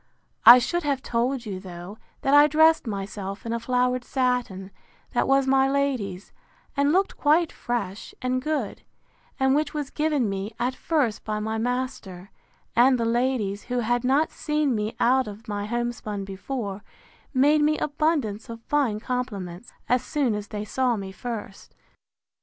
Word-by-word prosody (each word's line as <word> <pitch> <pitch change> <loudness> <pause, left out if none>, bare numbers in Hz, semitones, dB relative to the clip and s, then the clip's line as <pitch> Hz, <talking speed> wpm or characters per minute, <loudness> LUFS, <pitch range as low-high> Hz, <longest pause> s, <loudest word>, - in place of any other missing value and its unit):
I 240 - +13
should 345 +8 0
have 280 -4 -1
told 245 +2 -1
you, 195 -3 -5
though, 185 +2 -9 0.2
that 270 - +1
I 290 +1 +8
dressed 315 -1 +4
myself 200 0 -5
in 230 - -2
a 235 - -1
flowered 250 +1 0
satin, 245 -8 -1 0.4
that - - +1
was 270 0 +4
my 270 0 +3
lady's, 255 -9 -2 0.4
and 285 +1 +3
looked 380 +4 +1
quite 310 +3 +3
fresh 210 -5 -4
and 255 0 -1
good, 285 -7 -2 0.6
and 265 0 +3
which 305 +2 0
was 290 -2 -3
given 300 -6 +1
me, 195 +2 -4
at 245 +2 0
first, 265 -8 -1
by 215 -1 -2
my 220 +1 -2
master; 225 -6 -4 0.4
and 250 +2 +5
the 230 - 0
ladies, 230 -4 0
who 245 0 -1
had 240 +2 0
not 275 +5 +2
seen 300 -3 0
me 215 0 -2
out 260 +1 +3
of 210 +3 -10
my 205 -1 -3
homespun 235 -4 -3
before, 200 +1 -5 0.5
made 290 +3 +4
me 305 +1 +3
abundance 285 -8 -1
of 230 0 -7
fine 265 -8 +1
compliments, 215 -5 -4 0.2
as 250 +1 +2
soon 275 -6 0
as 210 0 -4
they 210 0 -5
saw 250 +2 +1
me 195 -2 -6
first. 215 -1 -7
245 Hz, 160 wpm, -25 LUFS, 210-270 Hz, 0.6 s, I